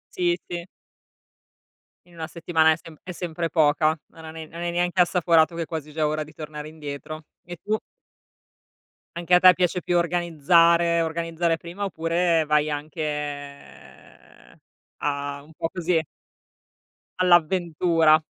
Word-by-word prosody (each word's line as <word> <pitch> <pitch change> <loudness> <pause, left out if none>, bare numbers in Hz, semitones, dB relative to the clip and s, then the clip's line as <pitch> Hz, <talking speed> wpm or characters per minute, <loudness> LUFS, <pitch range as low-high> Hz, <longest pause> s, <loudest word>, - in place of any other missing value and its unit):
Sì 175 -1 +1
sì. 175 -1 -5 1.4
In 175 - -20
1 160 -1 -5
settimana 160 -1 +2
è - - -3
sempr 160 -1 -14
è 185 - -7
sempre 170 -1 -4
poca. 155 0 +3
Non 160 0 -14
hai 160 - -8
ne 160 0 -7
non 165 +2 -10
hai 175 0 -2
neanche 175 +1 -1
assaporato 170 -2 +3
che 170 - -3
è - - -2
quasi 155 -2 -6
già 155 0 0
ora 155 +1 -1
di 155 - -16
tornare 150 -1 -8
indietro. 155 0 -8 0.2
E 175 +1 -7
tu? 215 +1 0 1.4
Anche 175 +1 +2
a - - +6
te 185 0 +8
piace 180 0 0
più 175 - +1
organizzare 170 0 +3
organizzare 165 0 -1
prima 170 +5 -7
oppure 165 -2 +1
vai 150 0 +2
anche, 150 +2 -6
ehm, 145 -1 -8 0.4
a 140 -1 -3
un 155 +2 -18
po' 165 +1 -3
così 175 -3 0 1.2
all'avventura? 170 -2 +3
165 Hz, 145 wpm, -24 LUFS, 155-175 Hz, 1.4 s, te